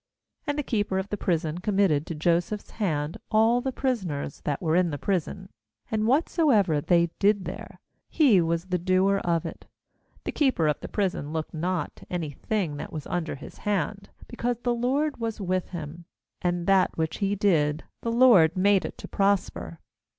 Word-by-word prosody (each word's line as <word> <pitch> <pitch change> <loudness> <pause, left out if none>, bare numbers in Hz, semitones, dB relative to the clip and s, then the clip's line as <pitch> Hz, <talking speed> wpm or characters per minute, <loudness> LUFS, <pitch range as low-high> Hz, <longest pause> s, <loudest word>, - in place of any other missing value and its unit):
^And 290 - 0
the 295 - -1
keeper 205 -6 -1
of 190 +1 -2
the - - -1
prison 165 -4 -1
committed 190 -6 +1
to 165 - -4
Joseph's 175 +6 0
hand 155 -7 -2
all 225 +3 +4
the 265 - -2
prisoners 190 - -2
that 145 -2 -1
were 160 -1 0
in 180 -1 +3
the 145 - -3
prison; 190 +2 -2 0.4
and 215 0 +1
whatsoever 245 - +3
they 170 +1 +3
did 200 -1 +3
there, - - -8 0.3
he 250 - +5
was 165 +1 -1
the 180 -1 -1
doer 185 +2 +2
of 170 -4 0
it. - - -8 0.6
^The - - -3
keeper 260 - +2
of 150 - 0
the - - -7
prison 185 -7 -2
looked 160 -1 -4
not 170 0 -2
to - - -15
any 170 -5 -2
thing 170 0 -2
that - - -6
was 155 -2 -6
under 175 -4 -2
his 140 - -11
hand, 200 0 -2 0.2
because 240 0 -2
the 245 - +2
LORD 275 +5 0
was 230 -1 -3
with 185 -2 -1
him; 170 0 -7 0.4
and 175 -1 -1
that 195 -1 +3
which 160 -1 -2
he 200 0 +1
did, 160 -7 +2 0.2
the 230 - -2
LORD 230 -10 +6
made 195 +1 +3
it - - -7
to - - -8
prosper. 195 -4 0
185 Hz, 180 wpm, -26 LUFS, 165-215 Hz, 0.6 s, LORD